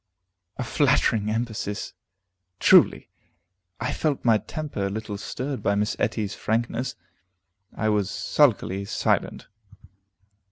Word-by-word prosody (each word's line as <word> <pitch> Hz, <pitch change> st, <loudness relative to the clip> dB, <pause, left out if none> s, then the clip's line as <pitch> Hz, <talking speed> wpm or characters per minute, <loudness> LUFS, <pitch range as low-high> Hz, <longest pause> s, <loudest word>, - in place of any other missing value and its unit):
A -, -, -2 dB
flattering 115 Hz, -4 st, +2 dB
emphasis, 110 Hz, -2 st, -3 dB, 0.7 s
truly! -, -, +5 dB, 0.7 s
I 120 Hz, -, -2 dB
felt 150 Hz, -5 st, -1 dB
my 115 Hz, -2 st, +5 dB
temper 110 Hz, -2 st, -4 dB
a -, -, -3 dB
little 105 Hz, 0 st, -5 dB
stirred 130 Hz, +6 st, -4 dB
by 100 Hz, -, +1 dB
Miss 105 Hz, +1 st, 0 dB
Etty's 105 Hz, -2 st, -1 dB
frankness. 120 Hz, +3 st, -2 dB, 0.8 s
I 110 Hz, -, -1 dB
was 105 Hz, -2 st, +1 dB
sulkily 100 Hz, -3 st, +1 dB
silent. 105 Hz, -, -1 dB
110 Hz, 110 wpm, -25 LUFS, 105-125 Hz, 0.8 s, truly